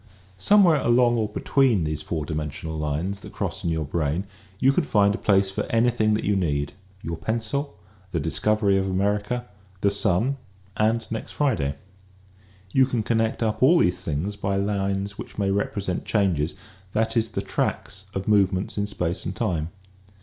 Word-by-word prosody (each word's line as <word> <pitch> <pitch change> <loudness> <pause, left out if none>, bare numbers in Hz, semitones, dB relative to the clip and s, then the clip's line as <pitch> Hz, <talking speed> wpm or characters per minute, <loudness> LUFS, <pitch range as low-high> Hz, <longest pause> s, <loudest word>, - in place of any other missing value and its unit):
Somewhere 170 - +5
along 120 0 +4
or 110 -2 0
between 120 -3 +2
these 75 0 -2
four 75 -1 -3
dimensional 75 +1 -4
lines 80 +6 -2
that - - -11
cross - - -3
in - - 0
your 80 -2 -1
brain 75 +3 -1 0.3
you 130 +6 +4
can 180 - +2
find 100 -7 +3
a - - -4
place 95 -1 +3
for - - -2
anything 115 -2 +2
that 105 - -2
you 105 - +1
need; 75 -6 0 0.3
your 85 - -3
pencil, 115 - -2 0.3
the 85 - -1
discovery 100 +4 +2
of 95 - -1
America, 105 +5 0 0.4
the 100 - +3
sun 100 +7 +1 0.4
and 110 +2 +1
next 110 - -5
Friday. 85 - 0 1.0
You 130 -1 +4
can 120 -4 -1
connect 115 +1 0
up 110 -1 -1
all 155 +7 +6
these 90 - +2
things 80 +7 -2
by 100 -1 -1
lines 100 0 -1
which - - -8
may 100 -1 +1
represent 100 -2 -1
changes, 90 -7 +1 0.4
that 110 +1 0
is 115 -1 +1
the 100 -2 -3
tracks 95 0 -2
of 95 0 -3
movements 100 -1 +2
in 100 - 0
space 90 -4 -2
and - - -4
time. 80 -3 -1
100 Hz, 170 wpm, -24 LUFS, 90-110 Hz, 1.0 s, all